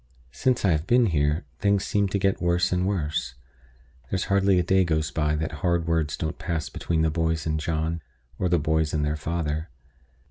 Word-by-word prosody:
Since 125 - +1
I 95 - +4
have 80 +2 0
been 120 0 +5
here, 75 -3 +1
things 100 0 +2
seem 100 -1 +1
to 95 - -1
get 95 0 0
worse 85 0 +2
and 90 +1 +1
worse. 80 -9 -2 0.7
There's 95 -1 -1
hardly 100 -1 +4
a 90 - +3
day 95 +2 +3
goes 80 -3 0
by 75 -1 0
that 80 +1 -2
hard 85 -2 +1
words 80 -3 0
don't 80 0 -4
pass 80 -4 -3
between 80 -2 -1
the 80 - +2
boys 80 -1 0
and 80 -1 0
John, 80 +1 -2 0.4
or 90 - +1
the 85 - +3
boys 80 0 0
and 75 -1 +1
their 75 +1 0
father. 80 0 -3
80 Hz, 200 wpm, -25 LUFS, 80-90 Hz, 0.7 s, been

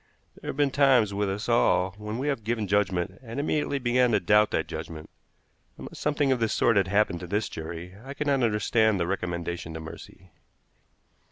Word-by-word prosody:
There - - -6
have - - -4
been 145 -2 +2
times 130 -7 +4
with 100 0 -1
us 100 +3 -4
all 95 -6 +3
when 105 +2 -5
we 135 +3 -2
have 140 -6 -1
given 110 -1 -1
judgment 95 -2 0
and 120 +1 -6
immediately 145 -1 0
began 125 -1 +2
to 105 - +4
doubt 105 +3 +4
that - - -1
judgment. 80 -2 -8 0.7
Unless - - -9
something 145 -2 +1
of 130 - +2
this 115 -1 0
sort 115 - +3
had 100 -2 +3
happened 100 -2 +1
to 90 - -7
this 105 +3 -1
jury, 85 +3 -7
I 135 +2 -8
could 150 - -3
not 140 -2 +2
understand 110 -1 +2
the 85 - +1
recommendation 85 -3 -3
to - - -5
mercy. 80 +3 -11
105 Hz, 195 wpm, -27 LUFS, 90-125 Hz, 0.7 s, times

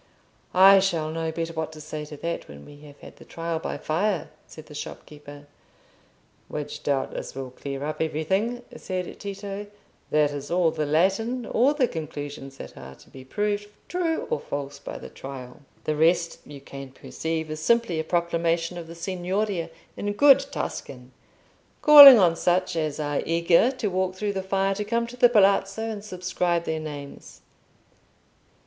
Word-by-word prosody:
"I 195 +1 +8
shall 170 -5 0
know 165 0 -2
better 165 +1 -4
what 160 -1 -3
to 155 - -11
say 150 0 -6
to 150 0 -10
that 170 +3 -4
when 70 0 -12
we 145 - -13
have 145 0 -15
had - - -13
the - - -14
Trial 165 -1 -4
by - - -4
Fire," 180 +4 -1 0.2
said 155 - -12
the 150 - -13
shopkeeper. 145 0 -9 1.0
"Which 150 0 -6
doubtless 135 -2 -2
will 135 -1 -6
clear 140 +1 -6
up 155 +1 -4
everything," 190 +10 -1
said 185 -2 -5
Tito. 200 0 -6 0.4
"That 150 -1 +2
is 145 -1 -6
all 175 -2 +2
the 155 -2 -2
Latin—all 225 - +1
the 265 -4 +2
conclusions 145 -5 -7
that - - -10
are 65 0 -11
to - - -20
be 130 - -11
proved 205 +7 -2 0.2
true 345 -2 -1
or 470 - +1
false 140 0 -6
by - - -7
the - - -9
trial. 130 -1 -10 0.2
The 155 - -1
rest 170 +2 +2
you 145 -2 -10
can 135 -1 -9
perceive 160 +3 -4
is 155 - -5
simply 230 -1 +1
a - - -1
proclamation 170 0 0
of 165 - -9
the 165 - -10
Signoria 185 +1 -2 0.3
in 205 0 -3
good 275 +4 +7
Tuscan, 125 - -6 0.7
calling 285 -4 +12
on 175 -5 +4
such 180 +1 +1
as 155 -2 -2
are 145 -1 -1
eager 170 +6 +3
to 240 -5 -3
walk 185 0 -1
through 205 +1 -2
the 190 - -2
fire, 195 +1 0
to 210 +2 -3
come 235 +2 -1
to 235 +1 -10
the 245 0 +5
Palazzo 200 0 +3
and 205 -2 -7
subscribe 180 -3 -1
their 160 -1 -2
names. 145 -2 -9
170 Hz, 170 wpm, -25 LUFS, 150-195 Hz, 1.0 s, calling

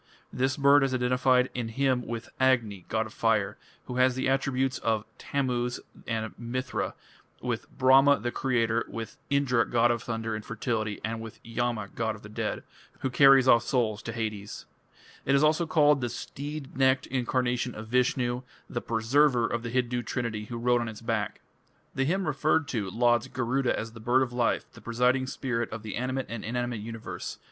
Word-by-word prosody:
This 130 +1 0
bird 140 0 +6
is 135 -1 +1
identified 125 0 +2
in 120 -2 -3
a - - -8
hymn 130 -1 +1
with 115 0 -5
Agni, 115 -8 +2
god 110 0 0
of 110 - -10
fire, 110 -3 +1 0.3
who 125 - -5
has 130 0 +4
the 130 - -1
attributes 135 -1 +1
of 110 -1 0
Tammuz 125 -3 -1 0.3
and 110 -1 -2
Mithra, 125 +2 -3 0.4
with - - -3
Brahma, 135 +2 +6
the 120 - -2
creator, 115 -3 +1
with 115 -1 -7
Indra, 135 -4 +3
god 120 0 +3
of 120 -1 -1
thunder 115 -1 -3
and 110 0 -4
fertility, 110 -1 -2
and 115 0 -3
with 115 -1 -9
Yama, 115 -3 -2
god 110 -1 -1
of 110 - -14
the 100 - -10
dead, 105 - -3 0.4
who 130 - -1
carries 135 0 +7
off 115 -2 +7
souls 115 -3 0
to 115 - -5
Hades. 110 -3 -5 0.6
It 140 - +2
is 140 - +4
also 155 +2 +3
called 150 -3 +4
"the 120 - -1
steed 145 +4 -6
necked 130 0 +3
incarnation 125 -1 -1
of 110 +1 -8
Vishnu", 125 0 +1 0.3
the 120 - -4
"Preserver" 120 +2 +3
of 115 0 -2
the 115 - -5
Hindu 125 0 0
trinity 115 -3 -3
who 120 +2 -6
rode 120 +1 +2
on 120 - -3
its 110 0 -9
back. 115 -3 -2 0.5
The 135 -1 0
hymn 190 +6 0
referred 150 +1 +1
to 105 -6 -2
lauds 120 +2 +2
Garuda 130 +1 0
as 115 +1 -4
"the 115 - -11
bird 125 +4 +3
of 120 -2 -5
life, 120 -1 +1
the - - -14
presiding 125 +3 +1
spirit 120 -3 -2
of 110 0 -7
the 105 -3 -5
animate 130 +2 -2
and 115 -1 -6
inanimate 120 0 -2
universe... 115 +1 -6
120 Hz, 185 wpm, -28 LUFS, 115-130 Hz, 0.6 s, carries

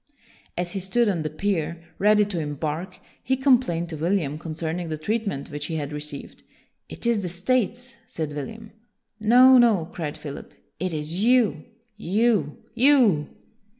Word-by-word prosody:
As 175 0 -2
he 195 - -3
stood 220 +6 +1
on 185 -5 0
the 155 - -2
pier, 170 -1 -2 0.2
ready 210 +1 +4
to 195 -4 -4
embark, 155 +4 -4 0.2
he 260 +1 0
complained 250 -11 +2
to 165 - -5
William 160 -3 -1
concerning 165 +1 -4
the 155 - -3
treatment 200 -5 -3
which 145 0 -5
he 165 - -4
had 150 -1 -4
received. 150 -1 -7 0.3
" - - -49
It - - -8
is 235 -3 +2
the 180 - -3
States," 240 +6 -1
said 155 -2 -4
William. 220 +9 -7 0.3
" - - -56
No, 250 +4 +7
no!" 210 -9 +3
cried 155 -4 -4
Philip. 145 -2 -9 0.2
"It 185 +1 -2
is 160 +5 -3
you, 245 -2 +3 0.3
you, 210 -6 +1 0.2
you! 235 - +4
180 Hz, 160 wpm, -24 LUFS, 155-225 Hz, 0.3 s, No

